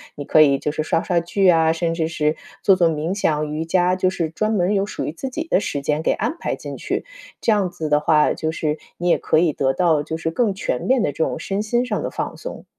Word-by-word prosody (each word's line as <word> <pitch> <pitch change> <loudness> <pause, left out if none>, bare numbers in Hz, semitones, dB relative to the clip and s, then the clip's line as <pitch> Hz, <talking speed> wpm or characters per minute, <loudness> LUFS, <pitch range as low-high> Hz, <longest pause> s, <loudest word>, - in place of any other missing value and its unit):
你 145 - -7
可 155 - +5
以 140 -2 +5
就 150 - -2
是 155 +1 -2
刷 165 +1 +1
刷 175 -2 +1
剧 190 +3 +1
啊， 165 -2 +5
甚 165 0 -1
至 165 -1 -1
是 155 -1 0 0.3
做 195 - +6
做 175 -3 +3
冥 160 +3 -2
想、 155 -6 0
瑜 155 +2 -3
伽， 180 +2 +2
就 185 0 +1
是 170 -3 -2
专 215 +7 -1
门 180 -4 +1
儿 205 - +1
有 195 -1 +1
属 210 - -5
于 - - -4
自 265 +10 -5
己 320 +6 -5
的 - - +3
时 145 - -3
间 150 +2 0
给 - - +2
安 235 +9 -1
排 - - -3
进 - - -7
去。 - - -3 0.3
这 - - +1
样 200 -3 +1
子 170 -3 -5
的 150 0 +3
话， 150 0 +3
就 160 -1 -2
是 155 -1 -2 0.2
你 175 - -2
也 - - +4
可 155 - +1
以 165 -2 +2
得 135 -1 +1
到 160 0 +2
就 160 - -4
是 160 0 -2
更 215 +2 +1
全 190 -10 -2
面 260 -1 +2
的 145 - 0
这 160 - -1
种 - - -2
身 195 +1 -2
心 240 +3 0
上 220 -4 -2
的 - - -2
放 - - -4
松。 - - -8
165 Hz, 295 characters per minute, -21 LUFS, 155-195 Hz, 0.3 s, 做